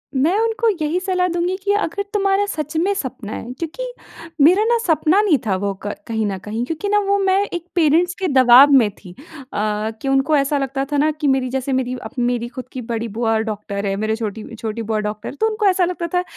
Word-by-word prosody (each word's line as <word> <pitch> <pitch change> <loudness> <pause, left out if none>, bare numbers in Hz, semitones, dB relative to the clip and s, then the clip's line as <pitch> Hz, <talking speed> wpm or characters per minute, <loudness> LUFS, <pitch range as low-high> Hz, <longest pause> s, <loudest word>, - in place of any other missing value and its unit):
मैं 315 +10 +2
उनको 455 0 +1
यही 310 +4 0
सलाह 365 -1 0
दूँगी 350 +1 -1
कि 405 0 +2
अगर 405 -1 -1
तुम्हारा 395 0 +2
सच 305 0 -4
में 375 +5 +2
सपना 255 - -5
है 240 - -6
क्योंकि 335 +9 -5 0.6
मेरा 365 +8 +6
ना 470 +1 +3
सपना 330 +2 +3
नहीं 375 -9 +3
था 200 -3 +1
वो 200 +1 -2
क 205 - -1 0.2
कहीं 220 -1 -1
न 195 -1 -3
कहीं। 215 +5 -4
क्योंकि 325 +8 -3
ना 415 0 +3
वो 400 0 +3
मैं 385 0 +2
एक 345 -1 -4
पेरेंट्स 340 +2 +3
के 380 - 0
दबाव 260 -1 +7
में 225 -5 +4
थी। 190 -2 -14 0.4
अ, 210 +1 -1
कि - - -4
उनको 270 +3 +2
ऐसा 280 +1 +1
लगता 275 0 -2
था 290 - +1
ना 300 +2 +3
कि 305 -1 -3
मेरी 265 -2 +1
जैसे 265 +1 -2
मेरी 255 -1 -1
अब - - -7
मेरी 240 -1 0
ख़द 255 - -6
की 255 - -6
बड़ी 230 0 -3
बुआ 225 +1 0
डॉक्टर 210 -2 -4
है। 195 - 0
मेरे 215 +2 -1
छोटी 220 -1 -5
छोटी 220 0 -4
बुआ 220 -1 -1
डॉक्टर 210 0 -4
है। - - -9
तो 445 - +4
उनको 430 -1 -2
ऐसा 370 -2 +3
लगता 345 -1 -3
था 360 0 +2
275 Hz, 230 wpm, -20 LUFS, 225-360 Hz, 0.6 s, दबाव